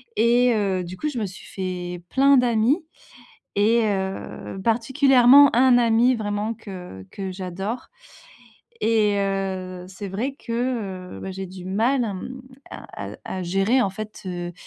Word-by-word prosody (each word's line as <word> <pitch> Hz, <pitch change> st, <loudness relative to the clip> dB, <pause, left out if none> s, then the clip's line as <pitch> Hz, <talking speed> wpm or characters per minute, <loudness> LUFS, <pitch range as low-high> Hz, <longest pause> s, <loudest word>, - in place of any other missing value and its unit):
et 240 Hz, +1 st, +4 dB
heu, 195 Hz, -3 st, 0 dB
du 180 Hz, +1 st, -8 dB
coup, 300 Hz, -, -2 dB
je 280 Hz, -, -6 dB
me 215 Hz, -, -1 dB
suis 190 Hz, -1 st, -10 dB
fait 180 Hz, -2 st, -5 dB
plein 275 Hz, 0 st, +5 dB
d'amis 245 Hz, +6 st, +2 dB, 0.7 s
et 220 Hz, +3 st, +3 dB
heu, 190 Hz, -1 st, -4 dB
particulièrement 260 Hz, +3 st, +5 dB
un 250 Hz, 0 st, +6 dB
ami 235 Hz, +2 st, +4 dB
vraiment 210 Hz, 0 st, -2 dB
que 180 Hz, -, -9 dB
que 190 Hz, -2 st, -5 dB
j'adore 190 Hz, +5 st, -5 dB, 1.0 s
et 215 Hz, -2 st, +3 dB
heu, 190 Hz, -2 st, -3 dB
c'est 195 Hz, +1 st, -7 dB
vrai 230 Hz, +9 st, -3 dB
que, 230 Hz, -7 st, -3 dB
heu, -, -, -9 dB
bah, 190 Hz, -, -5 dB
j'ai 190 Hz, 0 st, -5 dB
du 185 Hz, 0 st, -10 dB
mal, 235 Hz, +7 st, +1 dB
hem, 230 Hz, +5 st, -6 dB, 0.3 s
à -, -, -8 dB
à -, -, -10 dB
à 185 Hz, -1 st, -4 dB
gérer 195 Hz, +8 st, +2 dB
en 195 Hz, -, 0 dB
fait, 215 Hz, +2 st, -8 dB
heu 175 Hz, -1 st, -4 dB
205 Hz, 150 wpm, -23 LUFS, 190-245 Hz, 1.0 s, un